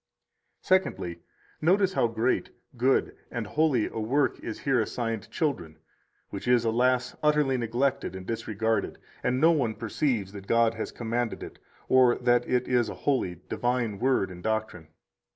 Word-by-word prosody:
112 185 0 +3
Secondly, 85 -1 -7 0.4
notice 190 +3 +3
how 120 - +2
great, 115 +2 0 0.3
good, 130 +3 +1
and 120 -2 -4
holy 140 -2 +2
a - - -5
work 130 +7 +1
is - - -6
here 135 -3 +2
assigned 115 -1 -3
children, 90 - -2 0.5
which 100 +4 -6
is, 120 -1 +4
alas! 125 +2 +1
utterly 150 -3 +3
neglected 120 -2 -1
and 95 0 -7
disregarded, 110 -1 -1 0.2
and 125 +1 0
no 160 +4 +6
one 125 -9 0
perceives 115 -2 -1
that 100 -1 -9
God 115 -1 +3
has 115 - -5
commanded 120 0 -3
it, - - -10 0.3
or 130 -2 +5
that 120 -1 +1
it 125 0 +1
is 125 -2 +2
a - - -6
holy, 90 - 0
divine 120 -4 -1
Word 125 -6 +1
and 90 -1 -10
doctrine. 110 -6 -2
120 Hz, 155 wpm, -27 LUFS, 110-130 Hz, 0.5 s, no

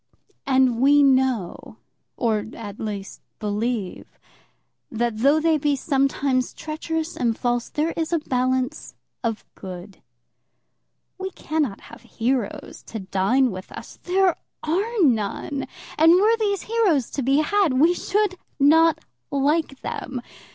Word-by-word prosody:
And 260 -3 +3
we 285 +2 +6
know 260 -8 +1 0.4
or, 220 -4 0
at 205 -2 -8
least, 205 -2 -5 0.2
believe, 210 -1 -3 0.7
that 230 -1 -2
though 280 +6 +4
they 315 -1 +2
be 290 0 +1
sometimes 270 -2 0
treacherous 320 +1 -4
and 230 -2 0
false, 240 -1 -1
there 310 +2 -1
is 325 0 -3
a 340 - +3
balance 255 -3 -1 0.3
of 225 -2 -2
good. 185 +1 -9 1.2
We 380 0 -3
cannot 305 - -2
have - - -13
heroes 240 -2 -3
to 220 - -6
dine 195 +7 +2
with 185 0 -8
us. 230 - -10
There 370 -1 +2 0.3
are 400 +6 0
none. 250 +2 0 0.3
And 325 +2 +7
were 425 +5 +4
these 405 -3 0
heroes 405 - +1
to 280 - -2
be 270 +2 +2
had, 375 -1 +2
we 315 +7 +4
should 395 0 0 0.2
not 320 +3 +5 0.3
like 280 0 0
them. 260 -2 -5
270 Hz, 130 wpm, -23 LUFS, 230-320 Hz, 1.2 s, And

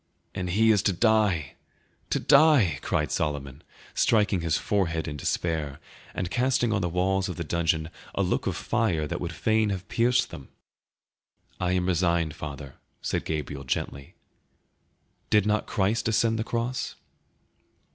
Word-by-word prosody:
"And 90 -1 -3
he 110 +5 +4
is 105 -3 +3
to - - 0
die, 105 - +2 0.5
to - - +1
die!" 125 - +5
cried 75 -3 -1
Solomon, 70 -2 -2 0.3
striking 105 -5 +2
his 80 -1 +1
forehead 85 -6 -1
in 75 - -4
despair, 75 -1 -2 0.4
and 90 -1 -3
casting 125 -2 +1
on 100 - +1
the 90 - 0
walls 95 +2 0
of 90 - -4
the 85 - -4
dungeon 80 0 0 0.2
a - - +1
look - - -1
of - - -1
fire 85 -10 0
that 85 +4 -4
would 85 -1 -3
fain 110 +5 +1
have 95 -1 -4
pierced 120 +1 +2
them. 70 -5 -10 1.1
"I 90 0 0
am 90 -1 +1
resigned, 85 -3 +1
father," 70 -2 -8 0.3
said - - -1
Gabriel 75 -3 -4
gently; 70 +1 -4 1.1
did 105 -1 +4
not 105 0 +1
Christ 105 +2 0
ascend 115 0 +2
the - - 0
cross?" 120 +2 -3
90 Hz, 150 wpm, -27 LUFS, 80-110 Hz, 1.1 s, die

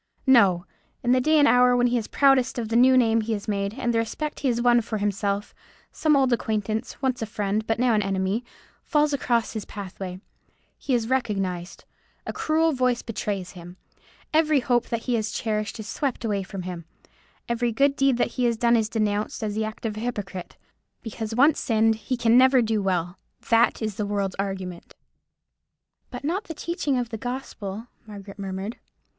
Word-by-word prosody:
No! 200 -9 +5 0.4
In 245 - +2
the 255 0 +4
day 310 +4 +3
and 290 -1 +6
hour 250 -1 +5
when 245 - +3
he 245 0 +2
is 215 - -6
proudest 270 -3 +3
of 225 -2 -3
the 225 - -1
new 255 +2 +6
name 230 -2 +3
he 225 +1 -2
has 205 -1 -5
made, 200 0 -2
and 240 -3 -1
the 230 - +2
respect 295 +7 -3
he 280 - -1
has 240 -2 +1
won 240 0 +4
for 220 -1 -4
himself, 200 0 -2 0.4
some 310 -2 +2
old 265 -3 +3
acquaintance, 220 0 -2
once 255 -2 0
a 225 - -2
friend, 210 0 -2
but 225 - +1
now 245 0 +2
an 210 - +3
enemy, 195 +3 -1 0.4
falls 300 -2 +2
across 240 -4 0
his 220 -2 -4
pathway. 190 -2 -7 0.6
He 265 - 0
is 230 -2 -1
recognized; 195 -8 -2 0.4
a - - -4
cruel 320 +1 +1
voice 250 -2 +1
betrays 200 -4 -4
him. 175 0 -11 0.6
Every 310 -2 +4
hope 240 -1 +1
that 230 -1 -2
he 250 - -1
had 220 -2 +1
cherished 215 0 -3
is 220 - -6
swept 270 -5 -2
away 205 -3 0
from 190 0 -7
him. 175 -2 -6 0.6
Every 235 0 0
good 275 +5 +2
deed 275 -3 +2
that - - +1
he 250 - +3
has 235 -1 +1
done 235 +1 +3
is 220 -2 +1
denounced 215 -1 -1
as 210 -1 -2
the 220 +1 -1
act 215 +1 -7
of 215 -1 -3
a - - -3
hypocrite. 205 -6 -5 0.5
Because 225 -1 -5
once 285 +5 +4
sinned 225 -1 +2
he 220 +4 -4
can 235 +1 +5
never 260 -1 +5
do 220 -1 0
well. 180 -2 -1 0.3
That 230 0 +3
is 215 -2 -3
the 210 - -2
world's 200 -2 -1
argument." 190 -3 -5 1.1
"But 245 - -8
not 360 +8 -1
the 325 - -7
teaching 300 -5 -1
of 245 -2 -2
the 225 -2 -6
gospel," 225 -4 -5 0.2
Margaret 200 -1 -10
murmured. 195 +3 -5
225 Hz, 195 wpm, -25 LUFS, 205-250 Hz, 1.1 s, and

